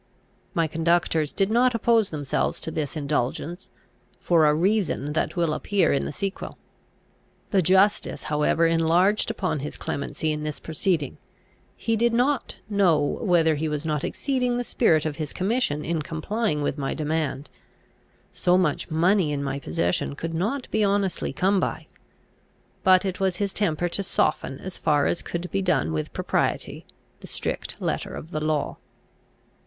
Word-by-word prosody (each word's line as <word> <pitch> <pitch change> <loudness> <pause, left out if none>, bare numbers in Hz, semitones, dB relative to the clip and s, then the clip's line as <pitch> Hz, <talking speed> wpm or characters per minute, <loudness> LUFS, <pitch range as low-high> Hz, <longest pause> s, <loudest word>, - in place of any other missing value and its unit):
My 165 - +3
conductors 165 -1 +1
did 195 +1 0
not 245 +1 +3
oppose 230 -2 +3
themselves 145 -3 -1
to 160 - -4
this 155 -1 -3
indulgence, 150 +4 -2 0.5
for 165 -3 +4
a 150 - +4
reason 180 -5 0
that 155 - -1
will 170 -3 +1
appear 200 +4 +1
in 140 - 0
the - - -3
sequel. 195 +5 -5 0.9
The 195 -3 +4
justice 190 +4 +3
however 150 +2 +2
enlarged 165 +5 +3
upon 160 -6 -1
his 145 +2 -6
clemency 155 +2 -3
in 150 0 -3
this 150 -1 -4
proceeding. 160 -2 -1 0.6
He 225 - -1
did 235 +1 +2
not 255 +4 +1
know 200 -6 +3 0.2
whether 170 -6 +3
he 155 +1 -1
was 150 +1 -3
not 150 -2 -1
exceeding 250 -3 -1
the 245 - -1
spirit 160 -11 +2
of 155 -2 -3
his 155 -3 -4
commission 190 - 0
in 165 -1 -1
complying 160 +2 -2
with 145 +1 -2
my 135 - -2
demand. 155 -2 -2 0.9
So 180 0 +3
much 170 -6 0
money 170 +1 +2
in 140 -1 -2
my 140 0 -2
possession 85 - -1
could 165 +2 -4
not 220 +11 -1
be 220 - +2
honestly 200 -2 0
come 195 +1 +2
by. - - -2 1.0
But 185 +1 +5
it 185 -1 -3
was 190 -2 +1
his 200 +1 -2
temper 175 -4 0
to 200 - -2
soften, 155 -7 0
as 190 -1 -6
far 145 -2 +2
as - - 0
could 175 +1 -5
be 195 - 0
done 155 - +1
with 75 -1 -3
propriety, - - -2 0.3
the - - -11
strict - - -4
letter - - -2
of 160 - -9
the 155 -3 -2
law. 155 -1 -1
165 Hz, 160 wpm, -25 LUFS, 150-195 Hz, 1.0 s, But